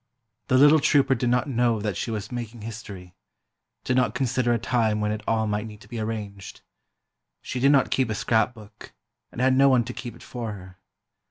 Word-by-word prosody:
The 130 - +3
little 145 +3 +7
trouper 140 -1 +3
did 125 -2 -1
not 125 +2 +1
know 120 -4 +1
that 105 -2 -2
she - - -3
was 110 -1 -4
making 120 -2 -6
history—did 105 +2 -9
not 125 -4 +1
consider 125 -2 0
a 120 - +3
time 115 -2 0
when 105 0 0
it 110 0 -3
all 110 -1 +1
might 105 +1 -2
need 105 -1 -11
to - - -15
be 120 - -6
arranged. 105 -3 -6 0.8
She 130 - -4
did 140 +3 +4
not 135 -3 +3
keep 130 -3 +1
a 110 - -2
scrapbook, 110 -1 -2 0.4
and - - -9
had 130 +1 +3
no 135 +1 +5
one 125 -3 +4
to 125 +2 -7
keep 120 -1 -7
it - - -15
for 115 -4 -5
her. 95 -1 -12
115 Hz, 200 wpm, -25 LUFS, 105-125 Hz, 0.8 s, little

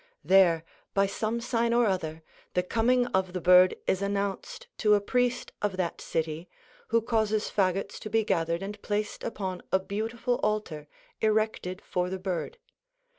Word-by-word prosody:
There, 170 -1 +5 0.3
by 195 0 +4
some 215 +4 -2
sign 235 -1 +1
or 240 0 +4
other, 160 -5 -2 0.3
the 180 - +2
coming 245 +6 +2
of 190 -1 +1
the 185 - -2
bird 180 +1 +6
is 190 - +1
announced 200 - -3
to 210 -2 +5
a - - +3
priest 245 +4 0
of 205 -3 -1
that 180 -2 -2
city, 160 +2 -3 0.4
who 230 -1 +2
causes 220 -2 0
fagots 195 -1 0
to 215 - -7
be 225 +1 +2
gathered 170 -3 0
and 205 +1 -6
placed 210 0 -2
upon 190 -5 -4
a - - +5
beautiful 225 +5 -2
altar, 195 -9 -2 0.3
erected 215 -4 0
for 180 0 -1
the 190 - -3
bird. 185 - -3
200 Hz, 160 wpm, -28 LUFS, 180-220 Hz, 0.4 s, bird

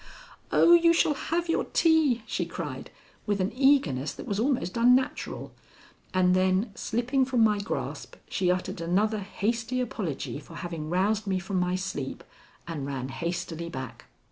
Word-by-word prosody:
"Oh, 340 - +6
you 335 0 +6
shall 320 -2 +3
have 335 +4 -2
your 330 - +1
tea!" 310 -8 +3
she - - -2
cried, - - -6 0.4
with 205 -1 +1
an 185 +1 0
eagerness 255 - +3
that - - -9
was 200 0 -2
almost 245 -7 0
unnatural, 250 +2 +1 0.6
and 180 -1 +3
then, 185 +4 +2
slipping 245 +6 0
from 255 -3 +2
my 210 -2 +3
grasp, 205 +3 -4
she 180 - 0
uttered 180 -1 -1
another 205 +6 +1
hasty 225 +5 -2
apology 185 - -3
for 160 +3 -13
having 165 -3 -5
roused 200 +4 +1
me 190 -1 +1
from 185 +1 -2
my 180 0 +1
sleep 185 -8 -4 0.4
and 150 -5 -4
ran 135 -2 -4
hastily 170 +2 -4
back. 130 -6 -7
195 Hz, 155 wpm, -27 LUFS, 175-245 Hz, 0.6 s, Oh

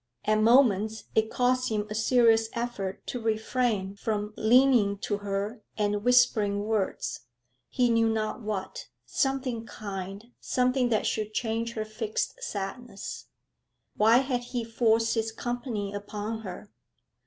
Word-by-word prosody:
At 215 0 +3
moments 220 -3 +4
it 220 0 +2
cost 255 +1 +1
him 210 -2 -1
a 210 - -5
serious 225 0 +4
effort 235 -5 -4
to 245 - -4
refrain 220 -3 0
from 210 0 -3
leaning 230 -3 +4
to 205 - -1
her 205 +3 -3 0.2
and 205 -1 0
whispering 220 -5 +3
words 210 - -2 0.4
he 250 -1 +2
knew 230 0 +3
not 220 +2 -2
what 205 -3 -4 0.2
something 265 -4 -1
kind, 200 +2 -7
something 250 0 +1
that 220 -3 +1
should 215 0 -2
change 230 0 -1
her 215 -1 -3
fixed 215 0 -3
sadness. 200 +2 -6 0.7
Why 220 +3 +5
had 250 -2 0 0.2
he 235 - 0
forced 225 0 +2
his 225 -1 -1
company 235 -4 -4
upon 210 +2 -4
her? 205 -1 -8
220 Hz, 130 wpm, -28 LUFS, 205-240 Hz, 0.7 s, Why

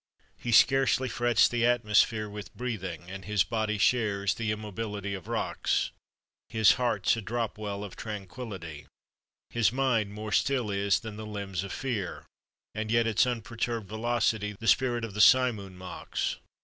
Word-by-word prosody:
He 120 - -4
scarcely 130 +2 +4
frets 120 -1 +3
the 120 -1 -1
atmosphere 110 -2 +3
With 105 0 -9
breathing, 95 -9 -4
and 95 0 -7
his 105 -3 +2
body 110 +2 -1
shares 100 -3 +2
The 110 -1 -2
immobility 105 -1 -4
of 95 -3 -7
rocks; - - -1 0.6
His 110 -2 +5
heart's 120 0 +1
a - - -3
drop 115 +1 -2
well 100 -1 -4
of 100 - -8
tranquillity; 95 - -7 0.6
His 115 -2 +2
mind 125 -5 +1
more 105 +1 -6
still 125 -1 +1
is 100 0 +1
than 110 -2 -7
the 110 0 -7
limbs 100 -3 -4
of 100 - -6
fear, 115 -9 -3 0.5
And 110 0 -3
yet 115 +1 +3
its 115 +2 +3
unperturbed 115 -2 -3
velocity 110 -1 0
The 115 - -5
spirit 120 -2 +3
of 110 - -8
the 105 - +1
simoon 110 -7 +4
mocks. 90 0 -4
110 Hz, 155 wpm, -29 LUFS, 100-120 Hz, 0.6 s, His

